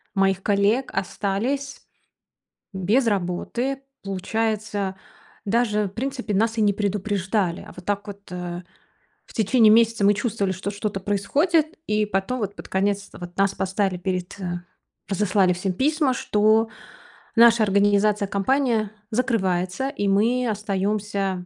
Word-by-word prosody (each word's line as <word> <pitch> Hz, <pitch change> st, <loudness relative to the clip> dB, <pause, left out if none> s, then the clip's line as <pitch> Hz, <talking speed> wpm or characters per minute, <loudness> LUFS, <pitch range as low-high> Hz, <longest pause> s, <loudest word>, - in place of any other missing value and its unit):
моих 195 Hz, -1 st, +2 dB
коллег 205 Hz, +5 st, +2 dB
остались 220 Hz, +9 st, -2 dB, 0.9 s
без 205 Hz, +7 st, +2 dB
работы. 220 Hz, +7 st, -1 dB, 0.2 s
Получается, 205 Hz, 0 st, -2 dB, 0.5 s
даже 210 Hz, -1 st, +1 dB
в -, -, -4 dB
принципе 245 Hz, 0 st, -4 dB
нас 225 Hz, +3 st, +1 dB
и -, -, +2 dB
не 205 Hz, -1 st, +3 dB
предупреждали. 200 Hz, -2 st, -1 dB
А -, -, -12 dB
вот 180 Hz, -, -11 dB
так 205 Hz, 0 st, -2 dB
вот, 200 Hz, 0 st, -10 dB
а, 180 Hz, 0 st, -5 dB, 0.6 s
в -, -, -16 dB
течение 220 Hz, 0 st, +4 dB
месяца 230 Hz, -2 st, +4 dB
мы 205 Hz, +1 st, +5 dB
чувствовали, 200 Hz, -3 st, -1 dB
что 190 Hz, +2 st, -4 dB
что-то 205 Hz, -1 st, -3 dB
происходит, 295 Hz, -, +1 dB
и 210 Hz, 0 st, +1 dB
потом 205 Hz, +5 st, -1 dB
вот 205 Hz, -1 st, -3 dB
под -, -, -10 dB
конец 200 Hz, +1 st, 0 dB
вот 175 Hz, 0 st, -9 dB
нас 195 Hz, 0 st, +2 dB
поставили 190 Hz, -1 st, -1 dB
перед, 180 Hz, 0 st, -3 dB
э 175 Hz, -2 st, -3 dB, 0.5 s
разослали 195 Hz, -2 st, +2 dB
всем 185 Hz, +2 st, -2 dB
письма, 280 Hz, -, +1 dB
что 215 Hz, 0 st, +2 dB, 0.7 s
наша 235 Hz, -1 st, +7 dB
организация, 205 Hz, 0 st, +3 dB
компания 220 Hz, +1 st, +1 dB, 0.2 s
закрывается, 200 Hz, -3 st, 0 dB
и 205 Hz, -8 st, -2 dB
мы 230 Hz, +6 st, +2 dB
остаёмся... 200 Hz, -2 st, -2 dB
205 Hz, 130 wpm, -23 LUFS, 195-225 Hz, 0.9 s, наша